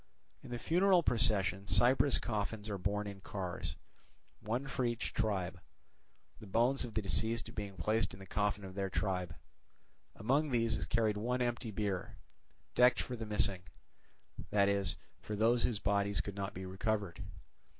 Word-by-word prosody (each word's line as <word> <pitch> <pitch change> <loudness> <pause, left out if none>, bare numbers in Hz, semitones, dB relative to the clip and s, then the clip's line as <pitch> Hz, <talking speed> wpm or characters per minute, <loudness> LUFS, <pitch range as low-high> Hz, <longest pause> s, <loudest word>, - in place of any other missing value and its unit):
In - - -11
the 120 - -3
funeral 180 +5 +4
procession 100 -5 +2
cypress 120 +7 +4
coffins 105 -1 -3
are 100 - -3
borne 105 +3 -1
in 100 -1 -7
cars, 95 -3 -4 0.6
one 120 +6 -2
for 135 -1 -2
each 120 -1 -1
tribe; 95 -4 -1 0.8
the 110 - -11
bones 120 +7 +2
of 115 -3 -7
the 110 - 0
deceased 110 +4 0
being 100 -3 -5
placed 110 +6 +1
in - - -14
the 95 - -9
coffin 100 +1 0
of 95 - -8
their 100 0 -2
tribe. 90 -4 -1 0.8
Among 140 +8 +1
these 115 -3 +2
is - - -3
carried 110 -2 +2
one 125 +4 0
empty 120 -1 -2
bier 100 -3 -3 0.6
decked 125 0 +5
for 125 - -3
the 110 -2 -6
missing, 100 -3 +2 0.9
that 100 -1 +4
is, 100 -3 +1 0.2
for 105 - -5
those 115 +3 +3
whose 115 - +1
bodies 100 -1 +1
could 100 +4 -3
not 100 0 -4
be 95 +1 -5
recovered. 95 -1 -2
105 Hz, 160 wpm, -34 LUFS, 100-120 Hz, 0.9 s, decked